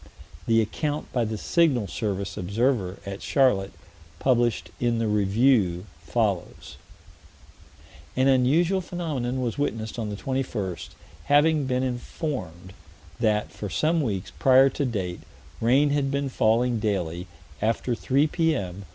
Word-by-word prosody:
The 115 0 +4
account 145 +7 -3
by 120 -2 +1
the 110 0 -3
Signal 140 -3 +2
Service 100 0 -3
observer, 100 0 0
at 100 0 -6
Charlotte, 115 -9 +2 0.4
published 120 -9 +1
in 120 -1 +1
the 115 - 0
Review, 105 -2 +2 0.2
follows: - - -2 1.4
"An 130 +1 +3
unusual 155 +9 +3
phenomenon 145 -8 -3
was 120 +1 -2
witnessed 115 -5 -2
on 110 -2 -3
the 105 - -4
21st: 110 -7 -3 0.4
having 145 0 +3
been 130 0 0
informed 120 - -5 0.5
that, 105 -2 +1
for 105 - -6
some 155 - +1
weeks 100 -9 -3
prior 135 +1 +6
to 140 - -2
date, 95 -8 -3 0.4
rain 135 +5 +4
had 140 -1 +1
been 140 0 -1
falling 120 0 +2
daily, 90 -4 -2 0.3
after 115 +3 0
3 135 +5 +2
P.M. 140 - -1
120 Hz, 125 wpm, -25 LUFS, 100-135 Hz, 1.4 s, prior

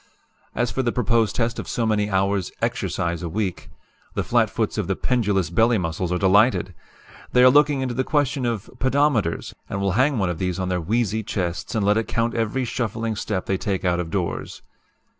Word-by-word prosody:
As 120 -1 0
for 130 - -1
the 120 -2 0
proposed 115 -2 +1
test 115 -1 -1
of - - -6
so 115 - -1
many 105 -1 +1
hours 95 -2 0
'exercise' 85 0 -1
a 85 - -4
week, 95 -3 -3 0.5
the - - 0
flat - - +2
foots - - -2
of - - -2
the - - 0
pendulous 105 - 0
belly 115 +6 +3
muscles 85 0 -2
are 90 - +1
delighted. 100 +1 +3 0.6
They 125 - +6
are 130 - +8
looking 145 0 +4
into 130 -2 -2
the 130 +2 0
question 145 -2 0
of 115 -5 -3
pedometers, 130 - +1 0.2
and 100 - -3
will 100 0 +1
hang 130 +7 +2
one 95 -4 +1
of 80 - -6
these 90 -1 -1
on 95 -1 -2
their 90 -1 0
wheezy 110 +3 0
chests 90 -5 -3
and 105 -3 +1
let 105 +1 +3
it 110 - -1
count 115 0 0
every 115 +3 -1
shuffling 115 -2 -2
step 100 -2 -3
they 95 - 0
take 95 -2 -2
out 90 -1 +2
of 85 -2 -3
doors. 90 -2 -3
105 Hz, 205 wpm, -23 LUFS, 95-120 Hz, 0.6 s, are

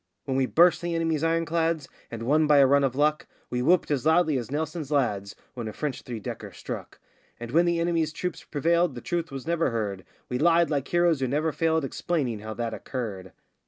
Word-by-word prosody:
When 135 - -2
we 130 -1 +2
burst 175 +5 +4
the 170 -1 -2
enemy's 165 -2 0
ironclads 165 -2 0 0.2
and 115 -1 -6
won 150 +5 +3
by 150 -1 +5
a 140 - +7
run 140 +1 +4
of 130 -2 0
luck, 150 +2 +1 0.2
We 125 - -1
whooped 170 +4 +3
as 140 -4 0
loudly 160 -1 +3
as 120 - -6
Nelson's 155 +1 -3
lads 105 -9 0 0.2
when 120 -3 -5
a 110 - -5
French 145 -1 -3
three 120 -4 -6
decker 100 - -7
struck; - - -7 0.4
And 120 0 -7
when 170 +5 +4
the 170 -1 +1
enemy's 165 -2 +1
troops 180 +1 -4
prevailed 170 0 +1
the 120 - -7
truth 170 -1 -2
was 135 -1 -6
never 165 -2 +1
heard 105 -5 -3 0.2
We 125 - -2
lied 170 +1 +4
like 140 -2 -1
heroes 175 -3 +2
who 130 - 0
never 150 +5 0
failed 160 -1 +1
explaining 135 -6 -2
how 110 +1 -7
that 115 -1 -3
occurred. 100 -8 -5
150 Hz, 210 wpm, -26 LUFS, 125-165 Hz, 0.4 s, a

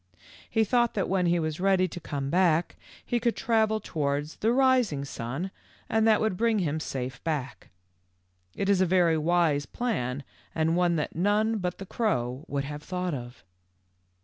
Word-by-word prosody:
He 225 - +2
thought 240 +2 +2
that 195 - 0
when 185 -2 +1
he 175 0 +3
was 155 -1 -2
ready 190 -1 +3
to 175 - -7
come 140 -4 -4
back 175 -2 +2 0.3
he 240 - 0
could 235 0 0
travel 220 -2 +1
towards 145 -3 -2
the 225 - +1
rising 250 - +3
sun 135 +9 -4 0.4
and 220 0 +2
that 215 -1 +5
would 220 -4 0
bring 230 0 +2
him 160 -5 0
safe 130 -4 -5
back. 150 -5 -4 0.9
It 195 - -2
is 200 -2 +3
a 185 - +3
very 175 -2 +4
w 160 +1 -1 0.2
T - - +1
ise 145 - -6
plan 140 - -2 0.3
and 160 +1 +2
one 175 -1 +2
that 150 - -2
none 210 +5 +2
but 180 -2 -3
the 195 - -7
crow 140 - -1
would 140 -1 -2
have 145 +1 -6
thought 180 +1 -3
of. 120 -2 -7
180 Hz, 180 wpm, -27 LUFS, 145-215 Hz, 0.9 s, that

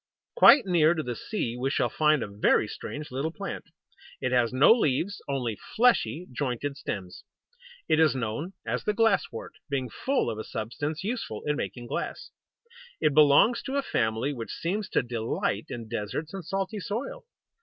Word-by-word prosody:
Quite 290 - +8
near 170 -3 +4
to 155 - -2
the 120 -3 -4
sea 120 - -3
we 130 +2 -1
shall - - +1
find 155 -4 +2
a - - -4
very 105 +1 +2
strange 145 +6 -7
little 135 +5 -1
plant. 195 +4 -6 0.5
It 125 - -1
has 125 -2 +3
no 130 +10 +7
leaves, 195 - 0
only 125 -6 -2 0.2
fleshy, 225 -8 +3
jointed 140 +1 -2
stems. 95 -9 -6 0.6
It 155 - +3
is 155 -4 +4
known 130 - -3
as - - -2
the 210 - 0
Glass 225 -3 +3
wort, 115 - -8 0.2
being 130 -4 -2
full 265 - 0
of 110 - -6
a - - -3
substance 145 - -4
useful 215 - -4
in 150 0 +1
making 125 -4 -5
glass. - - -4 0.7
It 155 -2 +2
belongs 150 - +6
to 270 - -4
a 280 - +1
family 110 - 0
which 115 -4 -6
seems 200 +5 -3
to - - +1
delight 115 -3 -2
in 115 -2 -6
deserts 115 - -4
and 195 -2 -5
salty 195 +5 -3
soil! 225 - -5
145 Hz, 175 wpm, -27 LUFS, 120-190 Hz, 0.7 s, Quite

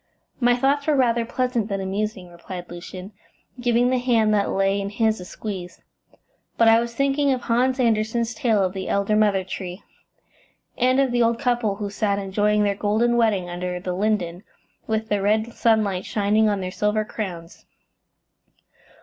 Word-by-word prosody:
"My 245 -1 +4
thoughts 275 +3 +1
were 305 - +3
rather 235 -3 +2
pleasant 245 -2 -1
than 200 -2 -3
amusing," 195 0 -3
replied 175 +1 -9
Lucian, 180 +3 -8 0.5
giving 245 0 +2
the 255 - +2
hand 230 -4 +2
that 200 -1 +1
lay 195 +1 +1
in 200 - -3
his 220 0 0
a 180 - -8
squeeze, 185 -2 -7 0.7
"but 230 - +4
I 225 0 +7
was 235 0 -4
thinking 275 +2 +1
of 255 -2 -1
Hans 255 +3 +1
Andersen's 230 0 +1
tale 230 -9 +1
of 185 -1 -1
the 190 -1 -5
Elder 200 +1 +1
Mother 205 -3 +3
Tree, 185 0 -7 0.9
and 255 +2 +2
of 270 -2 +2
the 240 0 +1
old 230 0 +2
couple 240 -5 0
who 205 0 -5
sat 200 -1 0
enjoying 205 +2 +1
their 200 -1 +2
golden 215 +4 +1
wedding 215 -6 +2
under 180 0 -4
the 180 0 -4
linden, 185 -3 -1 0.5
with 220 0 -1
the 205 -2 0
red 215 +3 +1
sunlight 215 -5 +1
shining 215 +1 +2
on 200 -2 -1
their 185 0 -4
silver 210 +2 0
crowns." 180 -6 -7
215 Hz, 170 wpm, -23 LUFS, 195-235 Hz, 0.9 s, I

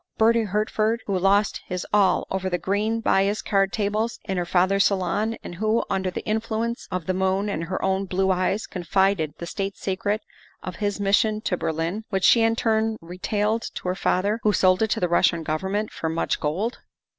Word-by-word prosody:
Bertie 225 0 +4
Hertford, 215 +3 0
who 195 -2 0
lost 200 +2 +2
his 180 -1 -4
all 200 -2 +3
over 190 0 -1
the 180 - 0
green 210 +6 -1
baize 200 -1 +2
card 195 -1 +2
tables 215 +2 -1
in 195 - -3
her 175 -1 -2
father's 190 +3 +3
salon 200 +4 -1
and - - -7
who, 215 +5 +1
under 190 -1 0
the 180 - -6
in 215 +1 +1
fluence 225 +1 -3
of 185 -3 -3
the 185 - 0
moon 190 +2 0
and 165 -4 -2
her 185 +3 -3
own 190 +1 0
blue 190 +1 +1
eyes, 185 +3 0
confided 180 -3 0
the 170 - -6
state 195 +2 -4
secret 205 +3 -2 0.4
of 180 -2 -6
his 205 -1 -2
mission 205 +2 +2
to 185 - -1
Berlin, 165 +6 -2
which 190 -3 -1
she 235 - +6
in 225 0 +3
turn 220 -1 +1
retailed 205 +6 -1
to - - -6
her - - +1
father, 200 +3 0
who 210 0 +2
sold 185 0 +3
it 220 - +2
to - - 0
the 180 - +1
Russian 170 -1 +2
Gov 155 0 -1
ernment 205 +4 -2
for 160 - -3
much 165 +1 -1
gold? 185 +11 -2
195 Hz, 200 wpm, -24 LUFS, 185-215 Hz, 0.4 s, she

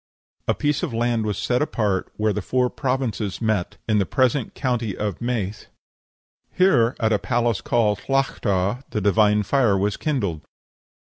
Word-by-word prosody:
A - - +2
piece 145 -1 0
of 150 -10 -3
land 115 -2 0
was 105 -2 -2
set 120 +5 0
apart, 105 -10 -1
where 105 0 +1
the 105 - -2
four 125 +4 0
provinces 125 -6 -2
met, 110 -6 -1
in 105 -2 +3
the 100 - +2
present 130 -2 +1
county 120 -7 -1
of 105 -4 -3
Meath; 110 -4 -3 0.8
here, 135 -11 +3
at 110 -1 +2
a 105 - +2
palace 120 -2 0
called 105 -4 +1
Tlachta, 120 -5 0
the 105 - -2
divine 105 +1 +3
fire 115 -3 +2
was 100 +1 0
kindled. 100 - -2
110 Hz, 160 wpm, -23 LUFS, 105-125 Hz, 0.8 s, in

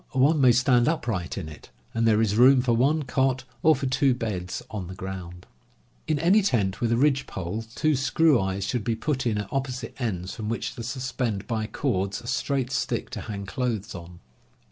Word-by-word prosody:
One 145 +3 +4
may 130 -2 +7
stand 125 0 +3
upright 115 - -1
in 90 -5 -4
it, 75 -1 -12 0.2
and 115 0 +1
there 110 0 +4
is 105 -2 +1
room 130 +3 +6
for 120 -2 +2
one 145 +7 +2
cot 130 -1 0 0.2
or 160 0 +5
for 135 - -4
two 130 0 +2
beds 95 -7 -4
on 100 -5 -5
the 95 - -8
ground." 90 -2 -7 0.6
In 155 -1 +1
any 180 +8 +4
tent 105 - 0
with 115 -1 +1
a 115 - +3
ridge 140 +1 +2
pole 95 +5 -4
two 155 -1 +2
screw 140 -1 +3
eyes 95 0 -2
should 120 0 -2
be 115 0 0
put 130 +2 -1
in 110 -2 +1
it - - 0
at 100 - -9
opposite 130 -3 -3
ends 95 -7 -3
from 110 -2 -5
which 115 - -3
to - - -8
suspend 125 -4 -3
by 110 -2 -2
_ - - -23
cords 100 -7 -1
a - - -14
straight 130 +1 -1
stick 125 - -2
to - - -5
hang 100 -2 -6
clothes 120 -2 -3
on. 85 -1 -10
120 Hz, 210 wpm, -26 LUFS, 100-135 Hz, 0.6 s, may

